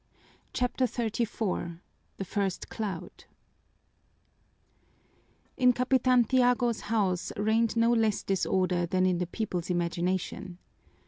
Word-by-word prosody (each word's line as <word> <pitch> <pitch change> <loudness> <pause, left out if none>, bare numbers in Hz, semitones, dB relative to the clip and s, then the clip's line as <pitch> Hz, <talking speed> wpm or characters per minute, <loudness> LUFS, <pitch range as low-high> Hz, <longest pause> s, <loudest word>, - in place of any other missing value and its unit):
CHAPTER 250 +1 0
XXXVI 220 -7 -2 0.4
The 195 - -4
First 195 -1 -2
Cloud 200 -7 -6 2.3
In 250 -1 +5
Capitan 255 0 +3
Tiago's 245 -1 +2
house 195 -5 0
reigned 220 +3 +2
no 230 +1 +4
less 220 -3 +1
disorder 185 -2 +1
than 185 +2 +1
in 180 -2 +2
the 180 - -1
people's 180 -3 -3
imagination. 175 +1 -2
210 Hz, 100 wpm, -29 LUFS, 180-235 Hz, 2.3 s, In